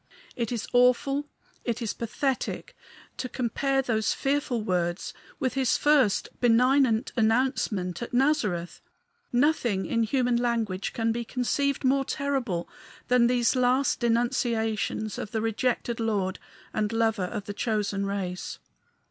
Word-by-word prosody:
It 235 -1 -2
is 235 -3 -3
awful, 260 +4 +3 0.4
it 235 -1 -2
is 230 -4 -2
pathetic, 270 - -3 0.4
to 255 - -4
compare 270 +3 0
those 220 -4 0
fearful 270 -5 0
words 175 -2 -1 0.3
with 260 -4 0
his 265 -2 +2
first 290 -9 +3
benignant 250 0 +3
announcement 225 -6 +1
at 235 - -5
Nazareth. 245 - 0 0.5
Nothing 240 - +2
in 230 - 0
human 245 +1 +1
language 230 -6 -1
can 225 -1 0
be 235 +1 -2
conceived 275 +4 -1
more 270 +1 +3
terrible 265 - -2 0.4
than 245 -1 +5
these 245 0 +2
last 255 +2 +2
denunciations 230 -3 0
of - - -5
the 220 - -2
rejected 230 +1 -1
Lord 205 -4 -1 0.3
and 210 0 0
Lover 225 -4 +1
of 200 +2 -5
the 205 - -5
chosen 205 -2 -1
race. 190 -2 -4
235 Hz, 130 wpm, -27 LUFS, 215-260 Hz, 0.5 s, than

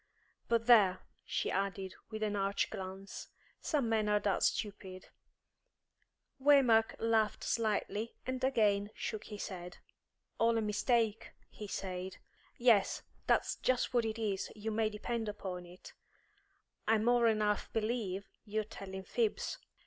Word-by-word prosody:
But, 230 -1 +2
there," 205 -7 +6 0.2
she - - -1
added, 195 -1 -2 0.2
with 220 -1 -4
an 210 -1 0
arch 195 0 0
glance, 190 +1 -7 0.3
"some 285 -7 0
men 220 -2 +1
are 210 0 +4
that 200 -2 +1
stupid 190 -3 -2 0.6
" - - -39
Waymark 260 -6 +5
laughed 225 -1 +1
slightly, 215 0 -1
and 255 0 -3
again 210 -6 +2
shook 215 -1 -4
his 210 0 -5
head. 180 -2 -8 0.6
"All 230 0 +4
a - - +2
mistake," 220 +1 +1 0.2
he 210 - -8
said. 185 -1 -4 0.4
"Yes, 235 -5 +4 0.2
that's - - +2
just 255 0 +1
what 240 -2 +3
it 220 0 -2
is, 205 -4 -2
you 220 +1 -4
may 220 0 +1
depend 220 +1 -3
upon 185 -4 -6
it. 180 +1 -13 0.9
I 225 - +5
more'n 230 0 +3
half 210 -1 0
believe 215 -4 -2 0.2
you're 215 0 -1
telling 190 -2 -8
fibs." 445 - -1
215 Hz, 135 wpm, -34 LUFS, 195-230 Hz, 0.9 s, there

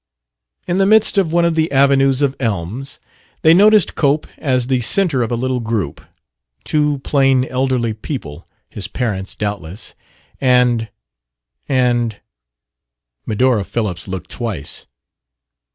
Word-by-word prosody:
In 180 +1 -1
the 195 - +3
midst 215 -1 +5
of 175 -5 0
one 170 0 +3
of 170 - +1
the 160 -1 0
avenues 135 0 +3
of 140 -1 +1
elms 115 +3 -3 0.5
they 160 - +7
noticed 210 +1 +5
Cope 145 +1 +1
as 130 -4 0
the 130 -1 0
center 160 - +2
of 115 - -2
a - - +1
little 130 +1 -1
group: 110 -9 -3 0.6
two 150 -2 0
plain, 135 -2 +2
elderly 130 -3 -1
people 105 - -7 0.2
(his 95 -3 -4
parents, 100 -4 -3
doubtless) 100 -2 -5 0.5
and 125 -3 +2 0.8
and 120 -4 +1 1.1
Medora 115 0 +2
Phillips 100 -5 -3
looked 95 -2 -6
twice. 105 - -4
125 Hz, 125 wpm, -17 LUFS, 110-140 Hz, 1.1 s, they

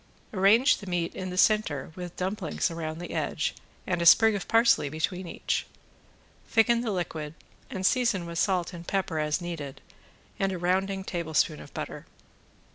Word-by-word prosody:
Arrange 210 +7 +5
the 200 - -11
meat 175 -2 -1
in 185 0 -5
the 180 - -6
center 185 -10 +2
with 180 -1 -7
dumplings 185 -2 -2
around 160 -1 -4
the 175 +1 -7
edge - - -1 0.3
and 175 -2 -1
a - - 0
sprig 220 +5 +7
of 200 -3 -4
parsley 230 -10 +4
between 175 +4 -2
each. - - -2 0.8
Thicken 235 +1 +3
the 240 - -2
liquid 160 -5 -3 0.3
and 190 -7 -4
season 235 -7 +2
with 170 0 -4
salt 185 -2 +1
and 170 -1 -9
pepper 185 -5 -1
as 150 +3 0
needed 160 -6 -6 0.6
and 195 0 +1
a 185 - -3
rounding 190 +2 0
tablespoon 160 -4 0
of - - -12
butter. - - -6
180 Hz, 165 wpm, -28 LUFS, 165-200 Hz, 0.8 s, sprig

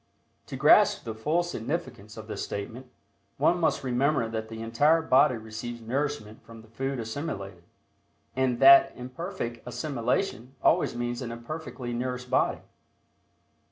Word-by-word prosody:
To - - -6
grasp - - +5
the 115 - -5
full 150 +10 0
significance 125 -8 -5
of 110 - -8
this 110 - -5
statement, 115 +6 -6 0.5
one 175 - +3
must 160 - +1
remember 130 0 +1
that 110 -1 -4
the 110 0 -7
entire 145 +8 +3
body 130 -4 +4
receives 110 +2 -7
nourishment 120 -2 -3
from 115 -1 -13
the - - -18
food 135 +4 -3
assimilated, 105 - -5 0.7
and 130 -2 +1
that 135 0 +8
imperfect 125 - -6
assimilation 125 - -2
always - - +3
means 120 +1 -3
an 120 -2 -5
imperfectly 120 0 -6
nourished 125 +1 -4
body. - - +1
125 Hz, 135 wpm, -27 LUFS, 115-140 Hz, 0.7 s, that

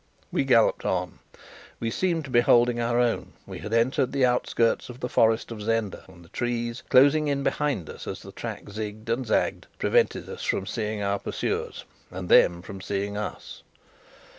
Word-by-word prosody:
We 140 - 0
galloped 120 -4 +4
on. 90 -2 -2 0.6
We 115 -1 -2
seemed 170 +1 0
to 135 - -9
be 120 -1 +5
holding 120 0 +4
our 120 +1 +1
own. 120 -2 0
We - - -8
had 105 - -7
entered 125 +3 +2
the 135 -2 +3
outskirts 125 -2 +1
of 125 0 -9
the 125 - -2
forest 115 -1 +2
of 110 -2 -6
Zenda, 110 -2 -1
and 85 -2 -16
the - - -19
trees, 120 0 -2
closing 145 +4 +5
in 140 -1 0
behind 145 - -1
us - - -9
as - - -6
the - - -10
track - - -6
zigged 105 +1 -6
and 120 +2 -1
zagged, - - 0
prevented - - +1
us - - -7 0.2
seeing 105 -2 -3
our 100 0 0
pursuers, - - -3 0.2
and 90 0 -7
them 85 0 +5
from 95 -1 -8
seeing 100 +1 -3
us. 105 0 -6
115 Hz, 180 wpm, -26 LUFS, 105-125 Hz, 0.6 s, be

